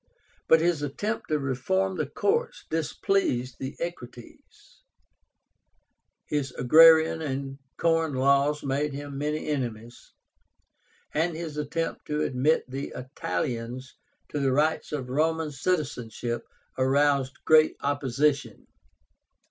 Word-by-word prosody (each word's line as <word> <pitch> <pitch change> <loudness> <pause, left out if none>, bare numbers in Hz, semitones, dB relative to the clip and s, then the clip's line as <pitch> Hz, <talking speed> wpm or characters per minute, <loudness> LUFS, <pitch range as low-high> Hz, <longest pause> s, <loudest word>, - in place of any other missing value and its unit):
But 160 - +6
his 170 -3 +1
attempt 205 +10 -3
to 155 - +1
reform 165 +8 -1
the 155 -4 -1
courts 465 - -1
displeased 155 -5 0
the 130 0 -5
Equites, 175 - -9 1.4
his 145 -3 -2
agrarian 160 +5 +6
and 135 -2 -4 0.2
corn 165 -3 +1
laws 140 +3 +2
made 140 +2 -1
him 145 0 -6
many 150 +1 -2
enemies, 120 -5 -5 1.0
and 165 +2 0
his 160 -2 -5
attempt 150 +2 -3
to 150 0 -1
admit 135 +5 +2
the 135 +2 -5
Italians 125 +1 -4 0.4
to 150 - -3
the 135 -1 +1
rights 155 +4 +1
of 140 -4 -3
Roman 160 +3 0
citizenship 125 -7 -2 0.3
aroused 135 0 +2
great 155 0 +5
opposition. 140 0 0
145 Hz, 110 wpm, -27 LUFS, 130-160 Hz, 1.4 s, But